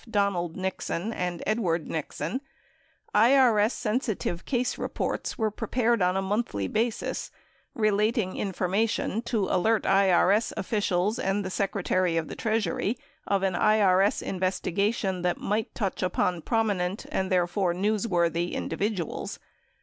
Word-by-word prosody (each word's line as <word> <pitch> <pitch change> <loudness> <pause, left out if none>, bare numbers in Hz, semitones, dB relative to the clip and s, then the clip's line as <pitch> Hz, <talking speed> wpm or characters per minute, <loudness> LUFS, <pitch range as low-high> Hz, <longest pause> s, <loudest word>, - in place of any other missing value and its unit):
Donald 200 -6 0
Nixon 190 +2 -3
and 180 -3 -3
Edward 180 -7 0
Nixon, 160 - -3 0.7
IRS 230 -2 +5
sensitive 215 -7 -2
case 250 -2 -1
reports - - -3
were 220 -2 0
prepared 235 +1 0
on 180 +1 +2
a 195 - 0
monthly 190 - -1
basis 225 - -1 0.5
relating 215 -3 +1
information 200 +3 0
to 230 -4 0
alert 220 +5 +2
IRS 195 +2 +3
officials 205 +2 0
and 195 +1 0
the 185 - -4
Secretary 185 -3 0
of 160 -2 -2
the - - -6
Treasury 220 0 -1 0.3
of 195 -1 +1
an 190 -1 +1
IRS 200 0 +3
investigation 190 +1 -1
that 180 0 0
might 215 +2 -2
touch 195 -5 -2
upon 180 -1 0
promi 220 +1 +1
nent 180 +3 -3
and, 190 0 -1
therefore, 180 +1 +2
newsworthy 175 -3 0
individuals. 200 -4 -3
200 Hz, 125 wpm, -27 LUFS, 180-220 Hz, 0.7 s, IRS